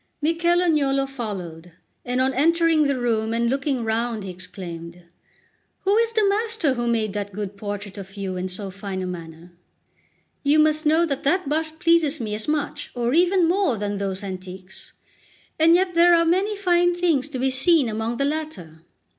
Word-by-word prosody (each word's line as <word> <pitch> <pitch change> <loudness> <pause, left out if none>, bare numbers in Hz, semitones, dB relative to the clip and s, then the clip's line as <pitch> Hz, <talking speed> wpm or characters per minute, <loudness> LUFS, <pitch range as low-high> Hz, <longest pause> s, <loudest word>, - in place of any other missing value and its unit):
Michel 340 +3 +2
Agnolo 275 -5 +2
followed, 180 -10 -7 0.3
and 250 +1 -2
on 260 +1 +2
entering 325 +2 +3
the 275 -2 0
room 225 -2 0
and 235 +1 +1
looking 275 -2 -1
round, 225 -1 -1
he 190 - -6
exclaimed: 175 -1 -8 0.8
"Who 395 +1 +2
is 460 +1 +2
the 435 -3 +3
master 415 - +1
who 240 -1 -2
made 220 -3 0
that 205 -1 -4
good 205 0 -5
portrait 205 0 -6
of 195 +1 -11
you 190 -2 -4
in 185 +1 -3
so 195 +1 -5
fine 195 -1 -5
a - - -3
manner? 170 -1 -8 0.9
You 290 +1 +3
must 310 0 +3
know 320 +3 +4
that 280 -4 -3
that 360 +2 +1
bust 315 +2 -1
pleases 325 -3 +3
me 215 -3 -4
as 215 +1 -2
much, 300 -1 -2
or 240 0 0
even 355 +1 +3
more, 360 - +1
than 205 0 -3
those 195 0 -3
antiques; 185 -1 -9 0.7
and 330 +2 +6
yet 365 0 +1
there 345 +1 +6
are 335 0 +3
many 385 +5 +1
fine 350 -2 +2
things 325 -6 +1
to 280 - -5
be 260 +1 0
seen 275 +2 +3
among 225 +2 -3
the 275 - 0
latter. 285 - -5
260 Hz, 180 wpm, -23 LUFS, 200-330 Hz, 0.9 s, and